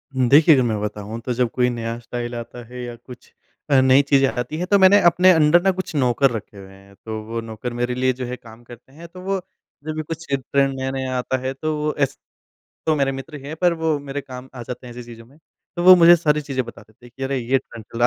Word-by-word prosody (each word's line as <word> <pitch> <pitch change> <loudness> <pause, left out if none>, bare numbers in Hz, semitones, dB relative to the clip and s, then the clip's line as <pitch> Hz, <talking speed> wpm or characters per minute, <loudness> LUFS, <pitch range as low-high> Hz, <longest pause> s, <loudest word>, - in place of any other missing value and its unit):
हुँ, 130 -1 +2
देखिए 155 +4 +7
अगर 130 - +3
मैं 110 -3 -1
बताऊँ 105 +1 -5
तो 125 +2 -3
जब 125 0 0
कोई 125 -1 +1
नया 115 -1 -4
स्टाइल 120 0 -6
आता 120 +1 -8
है 125 +1 -8
या 120 -1 -7
कुछ 120 +1 -15 0.4
अ, 140 -2 +5
नई 130 +1 +5
चीज़ें 135 -1 +3
आती 125 +5 -4
हैं 180 +2 -3
तो 200 - +6
मैंने 190 +2 +7
अपने 175 +2 +6
अंडर 160 0 +5
ना 195 +1 +3
कुछ 185 - -5
नौकर 130 0 +2
रखे 110 -2 -7
हुए 95 -1 -12
हैं, 100 0 -18
तो 110 -1 -5
वो 115 +1 -4
नौकर 115 +2 -6
मेरे 120 0 -1
लिए 130 +1 +1
जो 130 - -3
है 125 +1 -5
काम 115 -1 -15
करते 120 +2 -15
हैं। 165 +3 -11
तो 180 +2 -12
वो 195 +1 -2 0.5
जब 155 0 -4
भी 155 - -2
कुछ 165 +2 -7
ट्रेंड 135 +1 +1
नया-नया 130 -1 -3
आता 125 +1 -1
है 130 +1 -4
तो 155 +3 -3
वो 150 0 -1
एस 135 - 0 0.7
तो 155 - +2
मेरे 140 -2 +1
मित्र 135 +3 -8
हैं 150 +3 -6
पर 175 -1 +4
वो 155 -2 +2
मेरे 145 0 -5
काम 130 -1 -10
आ 125 - -7
जाते 125 +1 -8
हैं 120 - -10
ऐसी 125 +1 -8
चीज़ों 115 -1 -12
में। 135 +5 -22 0.4
तो 175 - -2
वो 185 0 +10
मुझे 170 +1 +9
सारी 150 -2 +1
चीज़ें 135 -3 -3
बता - - -11
देते 110 +2 -21
हैं 120 - -15
कि 135 - -5
अरे! 135 0 -1
ये 125 +2 +1
ट्रेंड 115 -3 -10
चल 115 - -10
रहा 120 - +4
130 Hz, 260 wpm, -21 LUFS, 120-150 Hz, 0.7 s, वो